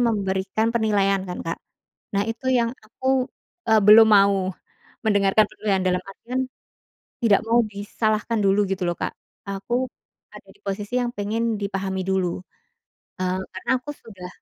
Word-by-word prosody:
memberikan 205 -1 0
penilaian 200 -4 +2
kan, 180 - -5
Kak. 165 - -4 0.5
Nah 200 +2 0
itu 245 +3 -2
yang 235 -1 +1
aku, 260 +4 -1 0.4
eee, 220 - +7
belum 215 +2 +8
mau 195 -2 +4 0.6
mendengarkan 200 0 +4
penilaian, 200 -3 -1
dalam 180 0 +1
artian 235 +6 -4 0.8
tidak 225 -5 +3
mau 230 0 +3
disalahkan 215 +2 -1
dulu 200 0 +3
gitu 185 -2 -1
loh, 175 - 0
Kak. - - -3 0.4
Aku 240 +6 -2 0.4
ada - - -14
di - - -29
posisi 205 +3 -4
yang 240 - -1
pengen 225 +1 -1
dipahami 195 -2 -3
dulu, 190 -2 0 0.9
eee, 185 +1 0
karena 185 - -8
aku 295 +3 -7
sudah 185 -8 -11
205 Hz, 140 wpm, -23 LUFS, 195-230 Hz, 0.9 s, belum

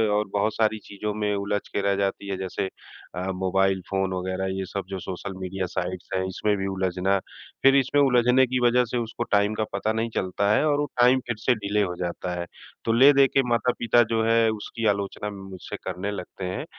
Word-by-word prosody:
और 105 0 0
बहुत 105 +1 +1
सारी 110 -1 +1
चीज़ों 105 +1 -4
में 105 -1 -1
उलझ 100 +1 -1
के 100 - -2
रह 100 0 +1
जाती 100 0 -2
है 95 - -2
जैसे 95 0 -3 0.5
अ, 95 +2 -2
मोबाइल 95 0 +1
फ़ोन 95 -1 0
वग़ैरह 95 +1 -2
ये 95 - -2
सब 100 +1 -4
जो 95 -1 -4
सोशल 95 +2 -6
मीडिया 95 0 -3
साइट्स 90 0 -4
हैं, 95 - +1
इसमें 105 +3 0
भी 95 0 -2
उलझना। 95 0 0 0.5
फिर 135 0 +7
इसमें 140 +1 +3
उलझने 125 -1 +4
की 130 +1 0
वजह 125 +1 +3
से 120 +1 -3
उसको 115 0 -3
टाइम 105 +1 +3
का 110 - 0
पता 100 +2 0
नहीं 115 +1 -1
चलता 100 +2 0
है - - +3
और 145 -1 +2
वो 145 - +1
टाइम 125 +2 +6
फिर 120 - -1
से 125 +3 +2
डिले 105 -1 0
हो 90 -3 -1
जाता 90 0 -4
है। 85 - -3 0.4
तो 115 - +2
ले 130 +5 +8
देके 135 0 +4
माता-पिता 120 0 +3
जो 115 -1 +1
है 115 0 +4
उसकी 110 +2 -5
आलोचना 100 0 -1
मुझसे 95 -2 -8
करने 100 +3 -3
लगते 100 -1 -6
हैं, 90 +1 -4
100 Hz, 210 wpm, -25 LUFS, 95-115 Hz, 0.5 s, ले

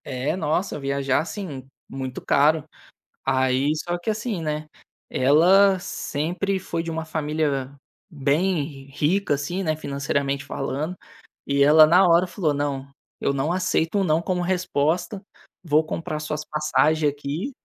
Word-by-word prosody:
É, 130 +3 -2
nossa, 160 +1 -1
viajar, 140 -1 0
assim, 160 -4 -5 0.3
muito 130 -1 -5
caro. 150 +2 +3 0.6
Aí 130 +1 +2
só 175 +3 -3
que 175 - -18
assim, 215 -2 -2
né, 155 -1 -3 0.4
ela 185 +9 +5
sempre 180 +2 -2
foi 165 -2 -3
de 165 - -4
uma 160 0 -4
família 150 -4 -2 0.4
bem 145 -1 -1
rica, 160 +5 +1
assim, 175 +7 -3
né, 155 -3 0
financeiramente 140 -1 -2
falando, 140 +5 -3 0.5
e 140 0 +3
ela 155 +2 +8
na 180 +4 +5
hora 170 +2 +4
falou: 170 -3 -1
"Não, 140 -1 -2 0.3
eu 140 - 0
não 140 +4 -1
aceito 180 0 0
um - - +2
“não” 160 -2 +2
como 180 +1 -1
resposta, 180 +1 0 0.4
vou 155 -2 +3
comprar 155 -1 -4
suas 155 0 -4
passagem 155 0 +2
aqui. 145 - -4
155 Hz, 140 wpm, -23 LUFS, 140-175 Hz, 0.6 s, ela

